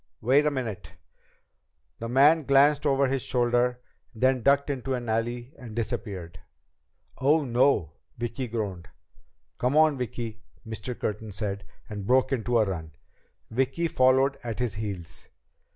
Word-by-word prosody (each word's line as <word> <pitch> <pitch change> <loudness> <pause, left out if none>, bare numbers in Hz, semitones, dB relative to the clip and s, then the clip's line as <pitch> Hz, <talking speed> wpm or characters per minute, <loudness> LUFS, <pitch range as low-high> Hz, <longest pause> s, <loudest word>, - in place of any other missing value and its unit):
Wait 140 +6 +3
a - - +5
minute!" 110 - -5 1.1
The 115 - -4
man 145 +6 +5
glanced 145 +2 +4
once - - +4
over 135 0 +3
his 135 0 -1
shoulder, 120 0 +1 0.3
then 130 +2 +2
ducked 140 +3 +3
into 135 -1 -2
an 120 -1 -5
alley 120 +4 -2
and 115 -4 -9
disappeared. 95 -6 -4 0.8
"Oh, 145 +3 +3
no!" 120 - +2 0.3
Vicki 120 +2 -3
groaned. 100 -6 -4 0.7
"Come 125 +4 +1
on, 155 -3 +4
Vicki," 115 -2 -5 0.2
Mr. 115 +2 -5
Curtin 110 0 -3
said, 100 -1 -4 0.2
and 105 -2 -6
broke 130 +2 +3
into 120 -2 +1
a 110 - +4
run. 80 -5 -5 0.6
Vicki 135 +8 0
followed 130 -1 +3
at 115 -3 -4
his 120 -4 -1
heels. 100 -6 -6
120 Hz, 140 wpm, -27 LUFS, 110-135 Hz, 1.1 s, a